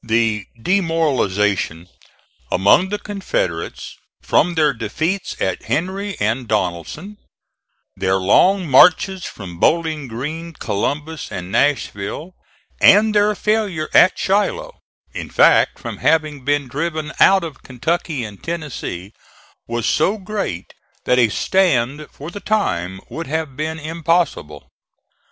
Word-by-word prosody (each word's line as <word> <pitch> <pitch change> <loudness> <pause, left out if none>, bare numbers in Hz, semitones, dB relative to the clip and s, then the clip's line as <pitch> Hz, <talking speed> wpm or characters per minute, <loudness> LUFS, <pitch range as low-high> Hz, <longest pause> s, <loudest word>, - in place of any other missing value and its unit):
The 110 -3 0
demoralization 115 - 0 0.6
among 100 - +4
the 210 - -2
Confederates 190 - -4 0.3
from 175 +2 +2
their 150 -3 +3
defeats 155 - -3
at 95 -1 -2
Henry 190 - -2
and 115 +4 -1
Donelson; 105 - -3 0.8
their 95 0 0
long 180 - +3
marches 180 +6 +5
from 90 -5 -9
Bowling 160 - +1
Green, 155 +8 -5
Columbus, 150 +7 -3
and 90 +1 -6
Nashville, 145 - -1 0.5
and 215 +2 +6
their 210 0 +3
failure 205 -7 -1
at 185 - +6
Shiloh; 450 - -1 0.3
in - - -6
fact - - +4
from - - -7
having 155 -4 +1
been 145 0 0
driven 155 +3 -3
out 195 -2 +6
of 155 -5 -7
Kentucky 145 +2 -2
and 105 -3 -9
Tennessee, 140 - -5 0.5
was 120 -1 -2
so 200 - +2
great 195 - -5 0.3
that 125 0 +3
a 120 -3 +4
stand 150 - +1
for 150 +4 -9
the 205 - -7
time 95 - -1
would 165 -1 -6
have 155 -2 -3
been 155 +2 -3
impossible. 160 - -1
150 Hz, 120 wpm, -19 LUFS, 110-180 Hz, 0.8 s, and